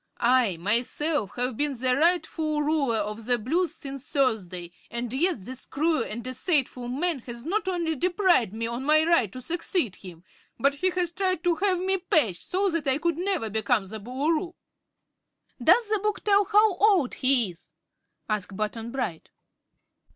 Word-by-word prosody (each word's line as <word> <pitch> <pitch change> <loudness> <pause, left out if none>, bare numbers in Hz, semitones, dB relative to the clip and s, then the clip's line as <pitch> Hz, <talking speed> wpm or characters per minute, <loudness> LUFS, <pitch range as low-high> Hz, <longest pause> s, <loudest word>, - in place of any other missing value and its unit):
I, 240 -7 +3
myself, 235 - +1
have 250 0 -1
been 290 +1 +1
the 250 +1 +1
rightful 315 -1 +1
Ruler 290 -6 +1
of 210 +1 -4
the 245 -1 +3
Blues 320 +11 -1
since 275 -1 -6
Thursday, 195 -12 -1 0.2
and 235 0 -4
yet 280 - 0
this 260 +2 -5
cruel 310 -1 0
and 230 +1 -6
deceitful 255 -1 0
man 295 +5 -1
has 235 +1 -7
not 400 +4 -1
only 340 -3 -1
deprived 350 - +2
me 225 +2 -4
of 235 +2 -3
my 305 +3 +4
right 330 - +2
to 255 - -8
succeed 330 - -1
him, 175 -3 -12 0.4
but 280 +4 +3
he 370 +7 +1
has 360 -2 -1
tried 370 -2 -1
to 350 -1 +3
have 375 +2 +2
me 380 +2 0
patched, 275 - +1
so 390 +1 0
that 330 -4 -2
I 265 0 +3
could 335 +1 -1
never 370 - 0
become 220 0 +1
the 220 +3 -7
Boolooroo." 305 - -2 1.1
"Does 470 -2 +5
the 430 -1 +1
book 425 +1 -2
tell 405 -1 +4
how 420 -2 +3
old 380 -10 +3
he 255 -7 +2
is?" 165 -1 -17 0.5
asked 200 -2 -3
Button 220 +2 -3
Bright. 235 -11 -4
275 Hz, 170 wpm, -26 LUFS, 230-345 Hz, 1.1 s, Does